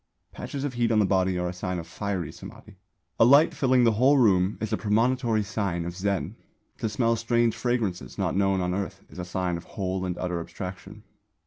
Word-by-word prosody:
Patches 140 -1 -6
of 145 -3 -2
heat 120 -1 +1
on 110 - +3
the 105 - +4
body 95 -1 +1
are 90 0 -1
a 90 - -4
sign 90 0 -3
of 85 - -5
Fiery 100 -3 -4
Samādhi. 105 - -12 0.5
A - - +7
light 140 +7 +6
filling 130 -2 +3
the 115 - +5
whole 130 +7 +4
room 95 -5 +3
is 110 0 -3
a - - +4
premonitory 115 +1 +1
sign 100 -4 -2
of 85 +1 -5
Zen; 100 0 -2 0.4
to 110 - -1
smell 115 +2 +1
strange 115 0 +1
fragrances 115 -6 -2
not - - -1
known 95 -1 +2
on 90 0 -1
earth 100 0 -4
is 80 - -10
a 90 - -4
sign 90 -1 -2
of 85 - -9
whole 95 -1 -2
and 90 -1 -3
utter 90 -1 -2
Abstraction. 95 +4 -8
100 Hz, 210 wpm, -26 LUFS, 90-115 Hz, 0.5 s, A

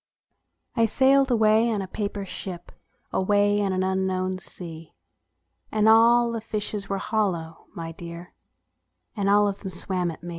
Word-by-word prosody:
I 230 -2 +3
sailed 270 +3 +4
away 220 -1 +4
in 210 -3 -1
a - - -7
paper 200 0 -4
ship, 180 -2 -7 0.4
Away 205 +1 +2
on 195 -1 0
an 185 0 0
unknown 185 0 -1
sea; 165 -4 -10 0.8
And 215 0 +2
all 235 +2 +6
the 230 -1 -3
fishes 210 -2 -4
were 195 - -1
hollow, 190 -6 -2
my 165 -1 -5
dear, 170 +1 -10 0.8
And 200 -2 0
all 205 0 +5
of 200 -1 -3
them 195 - -6
swam 180 0 -2
at 165 - -9
me. 175 - -6
200 Hz, 155 wpm, -25 LUFS, 185-220 Hz, 0.8 s, all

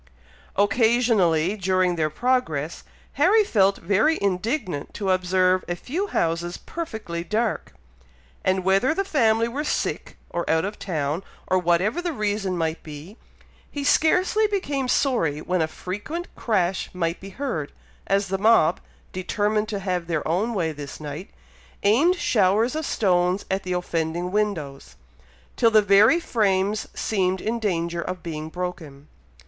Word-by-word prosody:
Occasionally, 205 -5 +3
during 185 -2 +1
their 155 -2 0
progress, 165 - -1 0.4
Harry 440 0 +6
felt 200 - +2
very 210 - +2
indignant 200 - -2
to 195 -2 -1
observe 185 0 +2
a 175 - -2
few 335 - -3
houses 170 - -1
perfectly 220 - -5
dark; 215 +5 -2 0.7
and 185 0 +1
whether 195 - +3
the 390 - 0
family 230 - +2
were 275 +6 -3
sick, - - -2
or 170 - -3
out 160 +2 +2
of 205 +1 -6
town, 155 -1 -2 0.2
or 185 - +2
whatever 180 - +1
the 350 -2 -2
reason 205 -5 -1
might 160 -1 -2
be, 155 +6 -10 0.5
he 285 - -5
scarcely 365 +9 +3
became 290 -10 -2
sorry 230 - +1
when 180 +2 -1
a 160 - +1
frequent 210 - -6
crash 190 -5 0
might 170 -1 -1
be 195 - -9
heard, 195 - -4 0.4
as 195 0 +1
the 195 0 -1
mob, 200 -6 +4 0.3
determined 210 +3 -1
to 210 - -2
have 180 -3 -2
their 160 -3 -2
own 205 +8 0
way 165 -4 0
this 145 -2 -8
night, 150 +4 -7 0.5
aimed 270 - +4
showers 225 - +2
of 315 -2 -2
stones 180 -1 +1
at 190 +1 0
the 185 -1 -3
offending 175 0 -2
windows, 175 -10 -2 0.6
till 230 - +4
the 215 -1 +5
very 205 - +5
frames 205 - 0
seemed 190 -3 0
in 230 +4 -2
danger 170 -5 -1
of 180 +1 -5
being 155 -2 -5
broken. 160 -5 -6
190 Hz, 145 wpm, -24 LUFS, 170-225 Hz, 0.7 s, Harry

